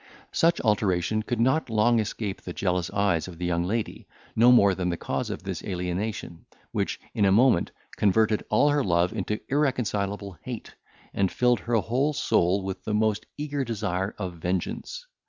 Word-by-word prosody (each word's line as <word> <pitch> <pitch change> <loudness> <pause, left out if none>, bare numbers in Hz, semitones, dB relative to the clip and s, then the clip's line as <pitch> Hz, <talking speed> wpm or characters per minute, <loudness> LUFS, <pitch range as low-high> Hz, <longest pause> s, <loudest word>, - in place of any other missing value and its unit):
Such 170 +1 +3
alteration 105 -2 +1
could 115 +1 -3
not 130 +4 +2
long 115 +2 +3
escape 105 -2 -3
the 90 - -7
jealous 90 -2 -1
eyes 100 -5 +1
of 90 -3 -9
the 90 - -3
young 85 -1 0
lady, 110 +4 -3 0.3
no 120 +2 +6
more 100 -6 +6
than 90 -1 -2
the 85 - -2
cause - - -3
of - - -5
this - - -5
alienation, 90 0 -4 0.3
which, - - -2
in 105 - +1
a 95 - +5
moment, 115 -3 +4 0.3
converted 110 +1 +2
all 125 +7 +4
her 145 -1 +2
love 85 -2 +2
into 105 0 -2
irreconcilable 105 - -1
hate, - - -7 0.4
and 95 -2 +1
filled 125 -1 +2
her 120 0 -1
whole 130 +7 +1
soul 95 -8 +2
with 95 0 -5
the 105 - -1
most 110 -1 0
eager 145 -1 -2
desire 100 -4 -2
of 95 -4 -4
vengeance. 95 - -3
105 Hz, 175 wpm, -26 LUFS, 90-120 Hz, 0.4 s, no